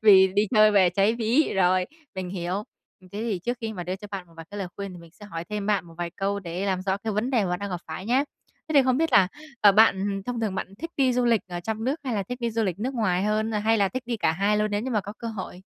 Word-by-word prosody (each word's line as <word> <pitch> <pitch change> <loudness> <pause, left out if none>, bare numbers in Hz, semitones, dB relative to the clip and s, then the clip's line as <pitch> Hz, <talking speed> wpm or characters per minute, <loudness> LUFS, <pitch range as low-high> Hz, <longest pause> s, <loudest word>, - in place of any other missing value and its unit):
vì 195 -3 +8
đi 205 - +4
chơi 215 0 +7
về 190 -4 +5
cháy 200 +5 +2
ví. 240 +6 +2
Rồi, 185 -1 +3 0.3
mình 185 -1 -4
hiểu. 185 +2 -2 0.4
Thế 185 - -17
thì 220 -5 -1
trước 245 0 -1
khi 225 -1 -3
mà 180 -4 -5
đưa 185 +2 -3
cho 210 - -10
bạn 190 -3 -5
một 165 - -21
vài 165 0 -9
cái 205 - -6
lời 190 -3 -3
khuyên 200 -2 -5
thì 175 - -10
mình 170 -1 -14
sẽ 205 +1 -13
hỏi 165 -4 -6
thêm 210 -1 -3
bạn 205 -3 +1
một 165 - -14
vài 170 -1 -3
câu 200 +1 -1
để 180 +2 -4
làm 185 -1 0
rõ 190 0 0
cái 220 +1 -4
vấn 215 +5 -1
đề 235 -6 +2
mà 180 - -2
bạn 180 - -1
đang 200 0 -5
gặp 180 - -3
phải 160 +5 -6
nhé! 260 +4 +3 0.4
Thế - - -2
thì 275 - +7
không 255 -1 +2
biết 325 +2 +1
là, 185 -2 +6 0.3
à, 205 -1 +7
bạn 200 -2 +3
thông 245 -2 -2
thường 210 -4 -1
bạn - - -2
thích 330 0 -6
đi 260 -2 +3
du 245 0 +1
lịch 230 -3 +3
ở 175 -1 -4
trong 220 +3 -3
nước 285 +5 -1
hay 250 - -1
là 200 - 0
thích 245 +6 -7
đi 235 - 0
du 225 0 0
lịch 185 -3 -1
nước 255 +6 -2
ngoài 190 -6 +1
hơn? 215 +2 0
Hay 220 +1 +2
là 200 -1 +3
thích 255 +5 -4
đi 240 - -1
cả 160 -7 +2
hai 200 +5 +1
luôn 210 0 +1
nếu 205 - 0
như 255 +4 -4
mà 215 - +1
có 200 +2 -8
cơ 230 - -4
hội? 190 -4 -6
205 Hz, 315 wpm, -26 LUFS, 185-225 Hz, 0.4 s, vì